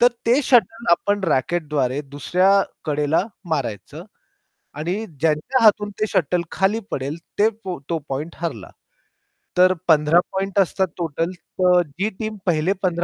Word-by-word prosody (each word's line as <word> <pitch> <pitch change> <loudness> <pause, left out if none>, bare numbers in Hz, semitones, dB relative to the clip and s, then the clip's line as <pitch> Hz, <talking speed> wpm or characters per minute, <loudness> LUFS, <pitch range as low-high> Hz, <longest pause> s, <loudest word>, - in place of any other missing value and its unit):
तर 245 - +7 0.2
ते 250 +5 +4
शटल 230 -2 +3
आपण 200 +3 +2
रॅकेटद्वारे 145 -3 0
दुसऱ्या 180 +8 +2 0.2
कडेला 150 +1 +1 0.3
मारायचं 140 - -3 0.7
आणि 170 +4 -1 0.3
ज्यांच्या 165 - +1
हातून 210 -1 +4
ते 215 - +2
शटल 175 0 +1
खाली 195 +4 +1
पडेल, 140 +3 -3 0.2
ते 215 +2 +5 0.4
तो 165 -1 0
पॉइंट 150 +5 -4
हरला. 150 - -5 0.9
तर 185 +1 +6
15 155 +1 +5
पॉइंट 195 +1 -1
असतात 190 0 +2
टोटल, 165 0 -2
तर 180 0 +1
जी 190 +10 -2
टीम 215 -1 -4
पहिले 175 +2 +2
पंधरा 185 -1 0
175 Hz, 135 wpm, -21 LUFS, 150-195 Hz, 0.9 s, तर